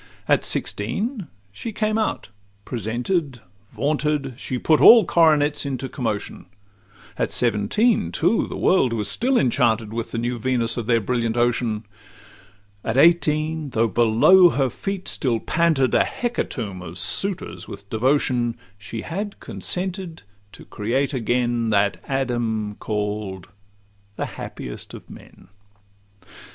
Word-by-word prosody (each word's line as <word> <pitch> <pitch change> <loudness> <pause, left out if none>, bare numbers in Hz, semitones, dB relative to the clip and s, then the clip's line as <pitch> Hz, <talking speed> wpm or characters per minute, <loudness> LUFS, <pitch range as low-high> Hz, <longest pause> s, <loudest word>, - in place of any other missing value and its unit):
At - - +3
sixteen 200 - -2 0.2
she 225 - -6
came 215 +1 0
out; 220 - -2 0.4
presented, 125 - -2 0.3
vaunted, 145 +1 -1
She 130 +1 -4
put 155 +4 +2
all 230 -2 +9
coronets 150 -3 +3
into 135 -2 -3
commotion: 115 -8 -4 0.7
At - - +1
seventeen, 120 - +1
too, 225 - +1
the - - -6
world 135 -10 +3
was 105 -3 -1
still 250 - +1
enchanted 115 - +1
With 115 0 -4
the - - -5
new 120 +1 -2
Venus 115 -1 +1
of 115 -3 -4
their 115 -2 +3
brilliant 115 +1 -1
ocean: 120 -2 0 1.0
At 115 +2 -2
eighteen, 155 -1 +3
though 115 -2 +1
below 120 - +5
her 135 -5 0
feet 195 - -5
still 120 -4 0
panted 160 -6 +1
A - - +5
hecatomb 115 - -4
of 90 -1 -9
suitors 190 - 0
with 100 - -10
devotion, 120 0 +1 0.2
She 110 +2 -7
had 200 +4 -5
consented 180 -2 -4 0.3
to - - -13
create 130 +7 -1
again 120 -1 0
That 100 -1 +2
Adam, 120 -6 -1
call'd 105 -3 -3 0.7
'The - - -3
happiest - - -8
of - - -13
men. - - -15
125 Hz, 125 wpm, -22 LUFS, 110-160 Hz, 1.0 s, all